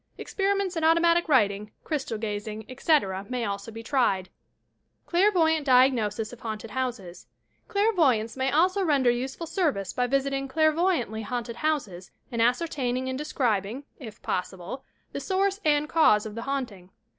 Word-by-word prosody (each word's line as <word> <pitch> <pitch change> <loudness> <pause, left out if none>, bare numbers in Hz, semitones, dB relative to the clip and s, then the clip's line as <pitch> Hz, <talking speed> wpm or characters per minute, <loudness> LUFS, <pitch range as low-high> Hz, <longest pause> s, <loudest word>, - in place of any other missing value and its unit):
Experi 395 0 -1
ments 385 -2 -2
in 325 - -1
automatie 335 +2 +4
writing, 210 -7 +2
crystal 270 -7 -3
gazing, 210 0 -5
etc., 255 - +1
may 250 -2 -2
also 200 +2 -4
be 225 +1 -8
tried. 210 -8 +1 0.8
CI^AIBVOYANT 340 -4 +3
DIAGNOSIS 245 -5 +3
OP 240 - -12
HAUNTED 220 -1 -6
HODSES 240 -9 -4 0.4
Clairvoyants 330 - +2
may 265 0 0
also 370 +5 +3
render 280 -7 +3
useful 260 +7 -4
service 300 - -1
by 250 0 0
visiting 275 +1 0
clairvoyantly 315 - +1
haunted 235 +1 -4
houses 215 - -2 0.2
and 235 -1 -1
ascertaining 255 0 0
and 260 +1 -3
de 300 - -4
scribing, 235 -3 -1 0.2
if 225 -6 -10
possible, 185 +7 -4 0.3
the - - -4
source 390 +1 0
and 300 -1 +2
cause 305 -11 +4
of 215 - -6
the 230 - -5
haunting. 240 -9 -4
255 Hz, 145 wpm, -26 LUFS, 220-315 Hz, 0.8 s, automatie